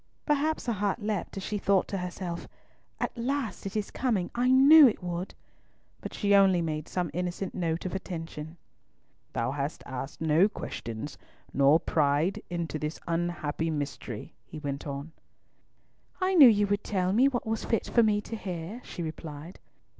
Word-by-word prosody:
Perhaps 300 +1 +1
her 235 - 0
heart 205 +2 -1
leapt 210 -2 -2
as 195 - -4
she 210 +1 -2
thought 195 -1 +2
to 195 - -2
herself, 180 -1 -5 0.5
"At - - -2
last 250 -3 -2
it 195 - -4
is 210 - -3
coming, 220 -9 0
I 245 +2 +1
knew 280 +3 +9
it 215 - -1
would!" 175 +1 -4 0.6
but - - -7
she 205 -1 +1
only 195 -3 +6
made 155 -2 -2
some 180 -3 -2
innocent 180 +2 -3
note 165 -2 -2
of 185 - -3
attention. 165 -4 -6 0.8
"Thou 115 +2 0
hast 140 +2 -3
asked 130 +2 -6
no 160 +5 +4
questions, 115 - -6 0.3
nor 140 +3 +5
tried 150 +4 +2
to - - -8
pry - - -17
into 170 -3 -3
this 150 +2 -4
unhappy 165 -2 -1
mystery," 140 -7 -5
he - - -10
went 140 -1 -4
on. 140 +3 -5 1.1
"I 375 0 +1
knew 295 -9 +10
you 205 -2 +3
would 205 0 0
tell 185 -2 0
me 250 +6 +5
what 250 -3 -1
was 220 0 -2
fit 225 - 0
for 235 - +4
me 210 -2 +3
to 225 - -6
hear," 185 +2 -5
she 175 - -6
replied. 155 +1 -7
180 Hz, 175 wpm, -28 LUFS, 155-215 Hz, 1.1 s, knew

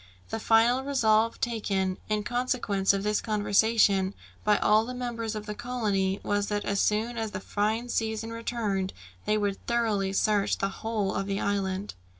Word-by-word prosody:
The 225 - -2
final 230 +4 +4
resolve 230 -5 +2
taken, 195 -5 -1
in 210 -1 0
consequence 240 -5 +1
of 195 0 -1
this 210 0 +1
conversation, 205 -2 +2 0.3
by 210 -1 +4
all 215 +1 +4
the 250 +2 -6
members 230 -3 -3
of 215 0 -5
the 210 - -4
colony, 210 -5 -1
was 205 0 0
that 205 -1 -2
as 200 0 0
soon 225 +3 +1
as 220 -1 -2
the 185 - -5
fine 215 +5 -1
season 225 -1 -2
returned 215 -5 -2 0.3
they 215 - +2
would 200 -2 -2
thoroughly 220 -5 +1
search 205 +1 +2
the 195 - 0
whole 210 -1 -2
of 195 - -2
the 200 0 -1
island. 200 0 -1
210 Hz, 165 wpm, -28 LUFS, 200-230 Hz, 0.3 s, final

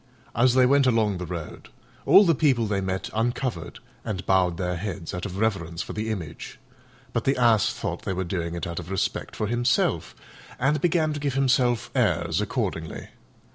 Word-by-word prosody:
As 120 +2 +4
they 130 -1 +6
went 140 +1 +4
along 110 -6 +2
the 90 - -5
road 85 -2 -7 0.4
all 205 - +8
the 170 - +4
people 135 -6 +2
they 100 -2 -1
met 95 0 -3
uncovered 115 -4 -2 0.3
and 95 -3 -4
bowed 90 -3 +2
their 90 -1 -2
heads 95 -2 -5
out 90 +3 -3
of 95 0 -7
reverence 95 -6 -1
for - - -7
the 110 +1 -3
Image; 85 -8 -6 0.6
but - - 0
the 135 - +1
Ass 115 -4 +4
thought - - -4
they - - -3
were 95 +1 -2
doing 85 -2 -3
it 85 - -4
out 85 0 -4
of 85 0 -8
respect 95 -1 -2
for 105 - -1
himself, 120 +3 0 0.4
and 150 +4 +1
began 160 -3 +2
to 145 - -4
give 140 -2 -2
himself 125 -4 +2
airs 85 +3 +1
accordingly. 100 -7 -3
105 Hz, 185 wpm, -25 LUFS, 90-125 Hz, 0.6 s, all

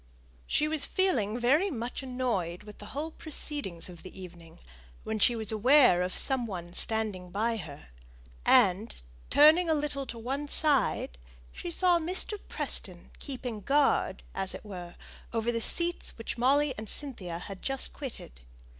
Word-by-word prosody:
She 300 - +2
was 310 -2 0
feeling 240 - +1
very 285 +11 +3
much 245 -5 -4
annoyed 240 -10 -2
with 210 -1 -12
the 205 - -10
whole 300 +7 -4
proceedings 290 - -3
of 175 -2 -11
the 185 +1 -10
evening 170 -3 -11 0.5
when 220 0 -3
she 240 +3 +4
was 220 -2 +1
aware 240 -3 +5
of 180 0 -2
some 260 -3 +2
one 175 -4 -6
standing 210 -4 -1
by 225 +5 0
her; 145 - -9 0.5
and, 190 - +4 0.3
turning 315 +4 +6
a 320 - +4
little 290 -2 -2
to 235 - -6
one 270 +6 -3
side, 275 - +1 0.3
she - - -6
saw 350 0 +4
Mr. 370 +5 -4
Preston - - -3
keeping 250 -6 -5
guard, 280 +5 +2
as 195 -1 +2
it - - -10
were, 180 -4 -8 0.4
over 230 +1 0
the 230 -1 -2
seats 345 +7 0
which 225 - -5
Molly 275 +4 +3
and 215 - -7
Cynthia 200 -12 -6
had 190 +2 -8
just 270 -1 -1
quitted. 230 - -8
235 Hz, 155 wpm, -29 LUFS, 195-290 Hz, 0.5 s, turning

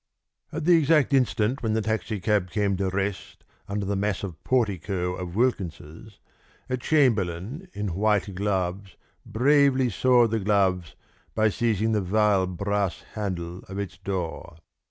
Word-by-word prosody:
At 155 0 -4
the 175 0 +6
exact 150 -2 +3
instant 125 -1 +1
when 110 -2 0
the 110 - +1
taxicab 105 -3 -1
came 100 0 0
to 95 0 0
rest 95 +1 -4 0.2
under 100 0 -3
the 100 +1 -1
massive 100 -3 -3
portico 95 -6 0
of 90 -1 -6
Wilkins's, 100 -4 -2 0.5
a 130 - -1
chamberlain 120 - 0
in 105 -3 -3
white 105 0 +1
gloves 95 -1 -2 0.3
bravely 135 0 +3
soiled 120 +1 +3
the 115 - +1
gloves 95 -4 +1 0.4
by 110 0 +3
seizing 110 0 0
the 105 -2 +1
vile 100 0 +2
brass 100 +1 -2
handle 90 -4 -4
of 95 - -6
its 100 -1 -5
door. 90 -4 -5
100 Hz, 135 wpm, -25 LUFS, 95-115 Hz, 0.5 s, the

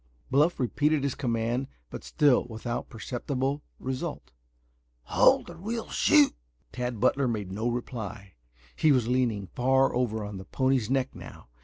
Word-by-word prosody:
Bluff 150 +6 +3
repeated 145 +4 +1
his 140 -2 0
command, 120 +1 -1 0.2
but - - -7
still 145 -5 +3
without 120 +1 -5
perceptible 130 +4 -3 0.2
result. 130 - -5 0.7
"Halt - - +4
or 170 - -12
we 225 +5 -3
shoot!" 145 -1 +5 0.4
Tad 125 -2 -3
Butler 135 +5 +2
made 105 -5 -3
no 110 +5 -1
reply. 110 -5 -5 0.4
He 155 - +4
was 125 -5 +3
leaning 120 -5 +1
far 130 +2 +3
over 110 -3 -1
on 105 -1 -6
the 95 - -9
pony's 130 0 +1
neck 135 0 0
now. - - -11
125 Hz, 145 wpm, -28 LUFS, 110-135 Hz, 0.7 s, shoot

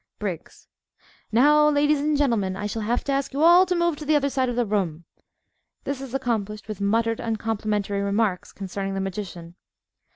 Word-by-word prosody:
_) - - -52
BRIGGS - - -6 0.6
Now, 300 +6 +5
ladies 295 0 +2
and 300 +1 +1
gentlemen, 225 -10 +1
I 200 +2 -5
shall 220 +2 -3
have 235 +3 -1
to 280 - -2
ask 275 0 -1
you 285 +3 0
all 350 +3 +7
to 360 - 0
move 340 -3 +1
to 305 - -7
the 305 +1 +3
other 280 -1 +1
side 260 -2 0
of 245 - -3
the 245 0 +1
room. 180 -6 -2 0.8
(_This 275 -1 -3
is 270 -1 -6
accomplished 220 -5 -2
with 210 -2 -6
muttered 225 +3 +1
uncomplimentary 215 -3 -2
remarks 200 -2 0
concerning 195 0 -5
the - - -2
magician. 180 -3 -6
225 Hz, 190 wpm, -24 LUFS, 200-280 Hz, 0.8 s, all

